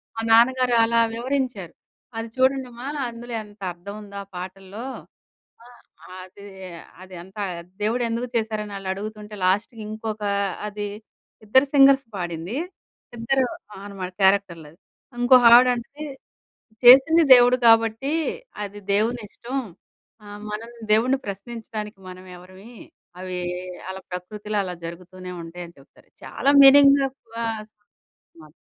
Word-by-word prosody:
మా 225 - -3
నాన్నగారు 245 +2 +4
అలా 230 0 +1 0.2
వివరించారు. 245 -8 -3 0.4
"అది 225 - -4
చూడండమ్మా 260 -1 0 0.2
అందులో 235 +1 -9
ఎంత 205 0 -19
అర్థం 200 +4 -10
ఉందో 200 -1 -11
ఆ - - -18
పాటల్లో." 190 +4 -8 0.8
ఆ! - - -16 0.6
అది, 195 +2 -15 0.6
అది 185 0 -12
అంత 190 +4 -15 0.4
దేవుడు 230 +4 0
ఎందుకు 235 +2 -3
చేసారని 215 -2 -3
ఆళ్ళడుగుతుంటే, 210 +2 -6
లాస్ట్‌కి 205 +5 0
ఇంకొక 215 0 -6 0.4
అది 210 0 -5 0.6
ఇద్దరు 260 +6 +4
సింగర్స్ 275 -2 +6
పాడింది. 175 +4 -5 0.6
ఇద్దరు 260 +3 +1 0.4
అనమాట 195 -3 -6
క్యారెక్టర్లది. 180 -5 +1 0.4
ఇంకొకావిడంటది, 245 +3 +5 0.8
చేసింది 275 +7 +8
దేవుడు 245 0 +6
కాబట్టి 225 +5 +3 0.5
అది 205 +1 -9
దేవునిష్టం. 235 +4 -2 0.7
ఆహ్, 205 0 -10
మనం 225 +3 -6 0.2
దేవుణ్ణి 250 +5 +3
ప్రశ్నించడానికి 210 0 -7
మనం 185 0 -11
ఎవరిమి? 185 +5 -15 0.5
అవి 185 -1 -5 0.5
అలా 190 - -7
ప్రకృతిలో 210 +4 -6
అలా 180 -1 -5
జరుగుతూనే 180 +2 -9
ఉంటాయని 170 0 -10
చెప్తారు. 135 - -22 0.2
చాలా 280 - 0
మీనింగు 275 0 +7 0.3
వాస్తవం. 215 -8 -9
215 Hz, 105 wpm, -23 LUFS, 190-245 Hz, 0.8 s, చేసింది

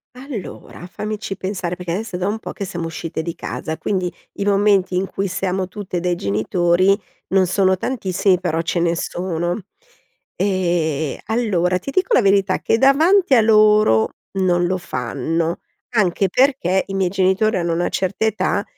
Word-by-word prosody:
Allora, 250 -8 -8
fammici 210 +2 -5
pensare, 185 -2 -3
perché 180 -2 -4
adesso 205 -2 -4
è - - -8
da 185 - -1
un 210 +2 -1
po' - - -7
che 200 - -5
siamo 175 -3 -5
uscite 165 0 -4
di 170 - -4
casa, 160 -1 -5
quindi 185 -3 -1 0.2
i 200 - -4
momenti 200 -2 +3
in 190 +2 0
cui 195 +1 -3
siamo 185 0 -2
tutte 190 -3 -5
dai 180 0 0
genitori 175 - +2 0.3
non 190 -1 +3
sono 190 +1 +2
tantissimi, 190 -5 0
però 165 -3 -1
ce 170 +1 -1
ne 170 0 +1
sono. 175 +1 -2 0.8
Ehm, 170 -6 0
allora 185 -6 +1
ti 275 - -7
dico 370 +5 +1
la - - +5
verità, 195 -2 +2
che 225 - +1
davanti 315 - +4
a 235 - +6
loro 215 - +4 0.2
non 180 -2 +2
lo 185 - 0
fanno, 165 +4 -2 0.3
anche 195 -2 +2
perché 250 -7 +2
i 195 - -6
miei 190 -2 +1
genitori 190 +3 +2
hanno 170 -2 0
una 175 +1 0
certa 195 +3 -1
età 205 -1 0
185 Hz, 165 wpm, -20 LUFS, 175-205 Hz, 0.8 s, a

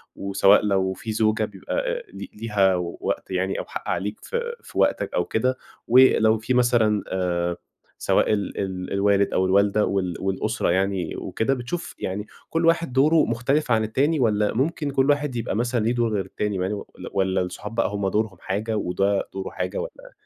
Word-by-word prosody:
وسواء 100 +1 +4
لو 95 -2 +1
في 110 +3 -6
زوجة 110 0 +1
بيبقى - - -6
آآ - - -3
ل - - -7
ليها 105 -4 +2 0.2
وقت - - -3
يعني 95 +1 -1
أو - - -4
حق - - -6
عليك 105 +2 -2
ف - - -7 0.3
في - - -11
وقتك - - +1
أو - - +1
كده، 130 0 0 0.3
ولو 115 -3 +5
في 115 +4 -2
مثلًا 120 -4 +3
آآ 85 -2 -1 0.4
سواء - - +2
ال 100 -2 -2
ال 95 -2 -3
الوالد 100 0 +2
أو 95 - +2
الوالدة 100 +2 +3
وال 90 -3 -1
والأسرة 95 +2 -1
يعني 95 -1 0
وكده، 135 +5 -1
بتشوف 130 +8 -5
يعني 100 +3 -3 0.2
كل 165 +1 0
واحد 165 -5 +2
دوره 155 +4 +4
مختلف 125 +4 0
عن 110 -1 +3
التاني، 140 +8 +1
والّا 105 -3 +2
ممكن 145 +3 -1
كل 135 +1 +2
واحد 145 -3 +1
يبقى 115 -4 -2
مثلًا 120 +2 0
ليه 115 +2 +1
دور 115 -2 +1
غير 95 -3 -1
التاني 105 +1 -3
مع 90 - -1
إنه 100 +1 -3
ل - - -7
والّا 95 -1 +1
الصحاب 95 +4 -6
بقى 115 -5 +1
هم 100 -1 -2
دورهم 105 -2 -1
حاجة 105 +3 -2
وده 100 +1 0
دوره 95 0 -4
حاجة - - -4
والّا؟ - - -7
105 Hz, 185 wpm, -24 LUFS, 95-125 Hz, 0.4 s, ولو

